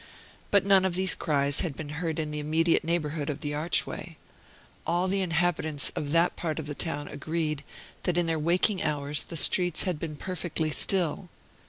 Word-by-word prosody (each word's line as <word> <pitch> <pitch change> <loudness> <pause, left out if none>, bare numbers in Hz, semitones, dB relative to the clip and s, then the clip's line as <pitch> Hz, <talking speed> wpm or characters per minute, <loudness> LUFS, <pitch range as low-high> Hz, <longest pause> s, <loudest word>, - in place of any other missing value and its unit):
But 200 -2 +3
none 195 -1 +5
of 190 -2 0
these 190 0 +4
cries 140 -2 +2
had 160 -6 -1
been 155 -2 -6
heard 160 +1 -3
in 155 -2 -2
the 150 - -3
immediate 160 +3 +2
neighborhood 155 -3 -2
of 145 0 -4
the 145 -2 -3
archway. 155 +3 -1 0.7
All 175 +2 +1
the 195 +1 0
inhabitants 165 -4 +1
of 145 - -3
that 170 +2 +3
part 160 -3 -3
of 160 - -4
the 145 - -4
town 145 -1 -3
agreed 155 0 -3 0.4
that 180 -2 -1
in 175 - +2
their 165 -1 0
waking 180 +5 +2
hours 145 0 0
the 165 - -5
streets 175 +2 +3
had 180 -5 -1
been 155 -2 -5
perfectly 165 -1 -3
still. 180 +1 +2
160 Hz, 185 wpm, -27 LUFS, 150-175 Hz, 0.7 s, none